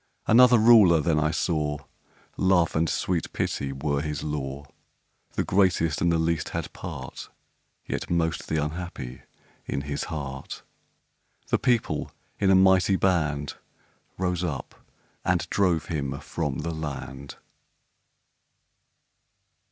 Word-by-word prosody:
Another 125 +2 +7
Ruler 105 -7 +7
then 75 0 +1
I 75 0 +2
saw 75 -2 -1 0.6
Love 90 -3 +2
and 80 0 +2
sweet 90 -3 -1
Pity 70 - -2
were 70 +1 -1
his 75 -2 -4
law: 70 -2 -4 0.7
The - - 0
greatest 90 -5 +2
and 85 - +3
the 85 - +2
least 80 0 0
had - - -5
part - - -7 0.6
(Yet - - -4
most 80 -1 0
the 80 - -1
unhappy) 75 -5 -4 0.5
in - - -2
his 70 0 -3
heart 70 -4 -6 0.9
The - - +2
People, 120 -3 0 0.3
in 100 - +3
a 95 - +6
mighty 95 0 +5
band, 75 -7 0 0.6
Rose 90 -1 -1
up, 75 -7 -4 0.5
and - - +1
drove 90 -6 +2
him 70 -4 -3
from 75 -5 -3
the 85 - -3
land! 70 -3 -6
80 Hz, 120 wpm, -26 LUFS, 75-90 Hz, 0.9 s, Another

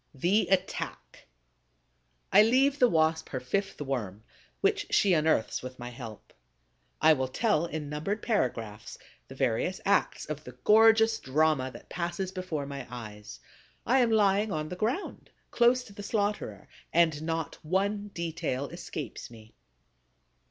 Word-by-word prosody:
THE 180 +8 +2
ATTACK 190 -1 -2 1.1
I 200 - +9
leave 265 +6 +3
the 250 - +6
Wasp 160 -1 +1
her 130 - -3
fifth 195 +11 -2
Worm, 115 -8 -4 0.4
which - - +1
she 195 -3 +4
unearths 155 -8 +1
with 130 0 -8
my 120 0 -7
help. 115 -4 -10 0.7
I 160 0 +6
will 130 -3 -1
tell 170 - +1
in 155 -3 -5
numbered 155 +9 -3
paragraphs 115 - -2 0.3
the - - -11
various - - 0
acts - - +1
of 150 0 -6
the 125 - -10
gorgeous 225 +1 +5
drama 145 -1 +1
that 120 - -12
passes 175 +2 -3
before 185 -6 -4
my 140 -2 -7
eyes. 105 -4 -9 0.5
I 260 +3 +4
am 240 -2 +3
lying 210 -1 +3
on 155 -2 -3
the 180 - -5
ground, 235 - -3 0.2
close 245 +1 +4
to 200 - -14
the 205 - -8
slaughterer, 205 - -2 0.2
and 160 -3 +3
not 165 -1 -3
one 200 +5 0
detail 165 -7 -3
escapes 155 -7 -7
me. 110 -2 -15
165 Hz, 145 wpm, -29 LUFS, 130-205 Hz, 1.1 s, I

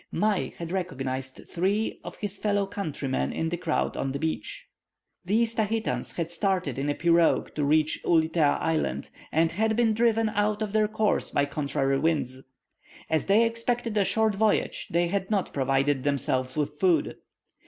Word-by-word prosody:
Mai 210 -3 0
had 170 0 -6
recognized 135 -8 -3
three 200 +5 -1
of - - -8
his 205 -2 -3
fellow 205 -1 +1
countrymen 155 -9 -3
in 160 - -2
the 175 - -1
crowd 165 -2 -1
on 135 - -2
the - - -2
beach. 160 - -3 0.6
These 225 +5 +1
Tahitans 220 0 -1
had 170 -1 -3
started 180 - -1
in 140 +2 -1
a 145 - 0
pirogue 170 -1 +3
to 150 - -1
reach 155 +2 +2
Ulitea 160 -2 +3
Island, 160 -1 -1 0.2
and 165 +1 +2
had 220 +4 +1
been 230 -1 +3
driven 225 0 +2
out 210 0 0
of 210 -1 -5
their 215 -1 +3
course 215 0 0
by 140 - +1
contrary 140 -1 -1
winds. 140 -5 0 0.7
As 160 - +1
they 210 +4 +5
expected 230 0 -1
a 205 - +4
short 220 +2 +2
voyage, 215 +1 +1
they 170 +1 +2
had 190 +2 -2
not 205 -4 0
provided 135 0 +1
themselves 130 -2 -1
with 150 0 -2
food. 170 -5 +2
175 Hz, 165 wpm, -27 LUFS, 145-215 Hz, 0.7 s, they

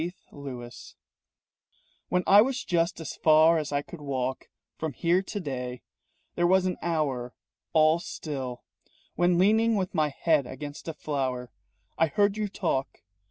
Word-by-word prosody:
THE 175 +2 -3 0.2
TELEPHONE 125 -4 -8 1.4
"When 180 0 +1
I 200 +2 +8
was 260 +3 0
just 170 0 0
as 160 -5 -6
far 160 +1 +5
as 150 -1 -4
I 145 0 0
could 170 0 -11
walk 130 -2 -3 0.3
From 160 -2 -4
here 170 +7 +2
to 205 +2 -5
day, 125 -6 -5 0.5
There 175 0 +2
was 190 +1 +4
an 180 -1 -1
hour 145 -7 -1 0.4
All 155 +1 +5
still 135 -7 -6 0.5
When 175 0 +2
leaning 220 +4 +4
with 190 -3 -1
my 155 -4 +2
head 145 -1 +1
against 145 +3 -8
a 165 - -4
flower 130 -5 -3 0.5
I 165 - +5
heard 205 +4 +2
you 215 -1 -1
talk. 165 -9 -2
160 Hz, 155 wpm, -27 LUFS, 135-180 Hz, 1.4 s, I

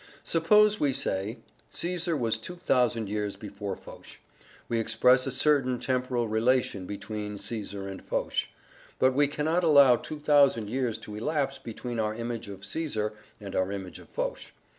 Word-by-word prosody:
Suppose 210 +6 +4
we 140 -2 +2
say 110 -3 -1 0.3
"Caesar 170 +2 -1
was 115 -3 0
2,000 125 - 0
years 105 0 -2
before 100 -2 -6
Foch," - - -13 0.5
we 115 - 0
express 125 +3 +3
a - - -1
certain 130 -2 +2
temporal 125 -1 0
relation 110 -3 +1
between 105 0 -5
Caesar 100 -2 -5
and 95 -1 -7
Foch; - - -1 0.5
but 130 0 +4
we 145 +2 +4
cannot 155 +5 0
allow 140 -6 +7
2,000 145 -8 +2
years 125 -3 -1
to 105 - -10
elapse 135 +4 -1
between 120 +1 -5
our 110 -1 0
image 115 -2 -4
of 100 0 -9
Caesar 110 -5 -2 0.3
and 100 -2 -7
our 95 +1 +1
image 95 -3 -6
of - - -15
Foch. - - -3
120 Hz, 150 wpm, -28 LUFS, 105-145 Hz, 0.5 s, allow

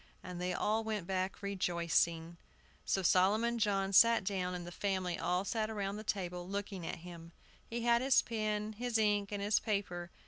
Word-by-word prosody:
And 180 -1 -6
they 180 0 -1
all 215 +4 0
went 215 -4 -3
back 190 +2 -2
rejoicing. 170 -3 0 0.5
So 190 - 0
Solomon 215 +7 +3
John 195 -2 +1
sat 230 +2 +6
down, 185 -2 -2
and 175 -1 -6
the 175 - -8
family 185 -2 -2
all 180 +3 0
sat 220 +1 -1
round 200 -1 -3
the - - -7
table 180 -4 -3
looking 200 -3 -4
at - - -3
him. 170 -1 -10 0.3
He 235 +1 -4
had 235 0 +3
his 265 0 +4
pen, 215 -1 -2
his 240 +1 -1
ink, 205 -2 +1
and 200 -1 -3
his 205 +1 +3
paper. 185 -5 -2
195 Hz, 180 wpm, -34 LUFS, 180-215 Hz, 0.5 s, sat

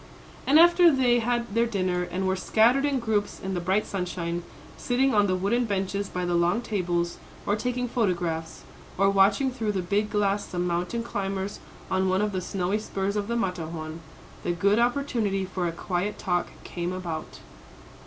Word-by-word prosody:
And 285 - +6
after 345 +1 +7
they 250 -3 +3
had 235 -2 -1
their 230 +1 +3
dinner, 185 -5 0
and 180 +2 -3
were 190 - +2
scattered 230 +8 +3
in 285 -2 +1
groups 215 -3 -1
in 190 0 -4
the 180 - -1
bright 190 +4 +1
sunshine, 175 -2 -3 0.3
sitting 260 +1 +1
on 205 -1 +4
the 185 - +1
wooden 215 +7 +1
benches 200 -1 -2
by 180 0 -3
the 175 - 0
long 175 +6 +2
tables, 175 -5 -1 0.3
or 205 - +2
taking 250 +3 -2
photographs, 175 -8 -1 0.3
or 195 +1 +4
watching 200 +7 +3
through 225 -5 -2
the 190 -2 -1
big 205 +4 0
glass 205 -1 0
some 180 0 -2
mountain 180 +7 -1
climbers 195 -2 -3 0.3
on 190 0 +2
one 190 +2 +2
of 210 - 0
the 185 -2 -2
snowy 190 +3 -1
spurs 195 -1 -2
of 205 -1 -1
the 235 - -1
Matterhorn, 165 -6 -3 0.4
"the 175 - -1
good 200 +5 +2
opportunity 235 -6 0
for 185 -1 -2
a - - -1
quiet 180 +4 -2
talk" 180 -3 0 0.2
came 175 0 -4
about. 175 -4 -5
195 Hz, 180 wpm, -26 LUFS, 180-230 Hz, 0.4 s, after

